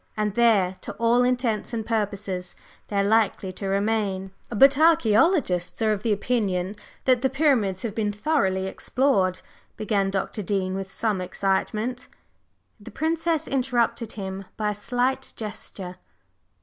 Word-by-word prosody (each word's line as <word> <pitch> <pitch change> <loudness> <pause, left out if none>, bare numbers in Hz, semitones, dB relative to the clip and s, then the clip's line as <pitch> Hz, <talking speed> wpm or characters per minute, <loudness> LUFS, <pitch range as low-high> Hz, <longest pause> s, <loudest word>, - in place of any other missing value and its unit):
And 210 -1 0
there, 205 -5 +3
to - - -6
all 235 +2 +3
intents 245 -3 0
and 220 -2 -3
purposes, 200 -5 -2 0.3
they 205 - -6
are 200 - +3
likely 205 -2 +2
to 195 +1 -6
remain." 195 -1 0 0.2
"But 270 +5 +6
archæologists 285 - +3
are 215 - +3
of 200 - -4
the 225 - 0
opinion 200 -3 0 0.3
that 255 -2 +4
the 265 - +2
Pyramids 255 -10 +1
have 225 -4 -3
been 210 -1 0
thoroughly 205 -5 0
explored," 190 -3 0 0.4
began 205 -3 0
Dr. 195 +2 -2
Dean, 190 -1 -1
with 195 0 -5
some 210 -2 0
excitement. 210 +6 -1 0.7
The - - -11
Princess 325 0 0
interrupted 245 -3 0
him 195 -1 -6
by 210 -1 0
a - - -2
slight 250 +5 -1
gesture. 195 -4 -6
215 Hz, 140 wpm, -25 LUFS, 195-245 Hz, 0.7 s, But